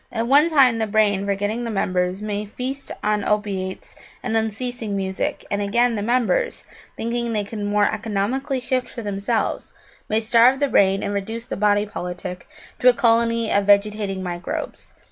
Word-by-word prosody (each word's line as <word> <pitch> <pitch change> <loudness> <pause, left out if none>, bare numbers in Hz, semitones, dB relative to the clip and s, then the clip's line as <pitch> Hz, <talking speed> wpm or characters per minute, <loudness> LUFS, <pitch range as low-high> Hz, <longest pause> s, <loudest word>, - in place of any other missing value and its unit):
At 230 -1 -1
one 285 +6 +5
time 260 -7 +4
the 220 - 0
brain, 205 -2 +2
forgetting 205 +4 -1
the 235 - -3
members, 185 -1 -1
may 210 -1 -2
feast 255 +6 -6
on 210 -1 +1
opiates 195 -3 -2 0.3
and 240 -2 -2
unceasing 225 0 -2
music; 190 -1 -2
and 205 - 0
again, 235 +4 +2
the 210 - -2
members, 255 - 0 0.3
thinking 235 0 -2
they 210 -1 0
could 210 +2 -7
more 205 0 +2
economically 220 +6 -1
shift 255 +1 -1
for 235 - -7
themselves, 205 +3 -2 0.4
may 215 - +2
starve 235 +4 +4
the 285 -1 +1
brain 195 -3 +3
and 200 - -2
reduce 225 +4 -4
the - - -5
body 205 0 +2
politic 180 -2 -6 0.3
to 250 - +6
a - - +5
colony 230 -1 +2
of 200 0 +2
vegetating 205 -1 +2
microbes. 175 -1 -5
215 Hz, 165 wpm, -22 LUFS, 200-235 Hz, 0.4 s, to